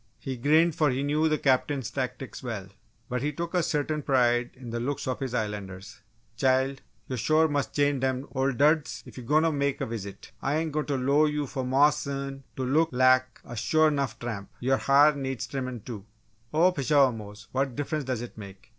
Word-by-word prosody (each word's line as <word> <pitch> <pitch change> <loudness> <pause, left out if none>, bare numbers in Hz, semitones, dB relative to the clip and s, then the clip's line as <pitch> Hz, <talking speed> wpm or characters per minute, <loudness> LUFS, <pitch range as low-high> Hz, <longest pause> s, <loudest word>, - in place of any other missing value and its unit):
He 135 -2 -5
grinned 155 +7 +3
for 155 -2 +2
he 130 +2 -1
knew 150 +2 +2
the 155 - +2
Captain's 135 -3 +1
tactics 130 +1 -4
well. 110 -7 -5 0.4
But 125 0 -2
he 150 +2 0
took 170 +4 -5
a 180 - +3
certain 150 -1 -1
pride 120 -3 +2
in 125 -3 -9
the 120 - -2
looks 140 +3 -3
of 130 - -2
his 130 -3 -3
Islanders. 100 -3 -5 0.4
"Chile, 130 +2 +2 0.3
yo' 130 - -3
sure 155 +6 +3
mus' 145 -2 0
change 145 -1 +1
dem 130 +1 -1
old 135 -2 0
duds 150 -1 +2
ef - - -10
yo' - - -8
goin' 150 +6 +3
to 165 - +3
mek 140 -1 0
a 135 - -1
visit! 105 -4 -7
Ah 140 - 0
ain't 160 +1 0
goin' 150 0 -2
t' 140 -2 0
low 140 +4 +3
you' 150 -1 -1
Maw's 135 +3 +3
son 140 -1 -5
t' 130 - -2
look 155 +6 +2
lak 130 -1 +3
a 120 - -8
sure 155 +7 +3
'nough 140 -2 -2
tramp! 105 -5 -5
Yo' 130 +2 +2
ha'r 145 +2 +5
needs 135 -3 -3
trimmin', 130 -4 -4
too!" 110 -6 -7 0.5
"Oh 170 +4 +4
pshaw, 140 -4 +3
Mose, 105 -1 -9
what 135 -1 -1
difference 145 +1 -2
does 125 -2 -2
it 120 - -9
make? 100 -2 -11
135 Hz, 205 wpm, -27 LUFS, 125-150 Hz, 0.5 s, ha'r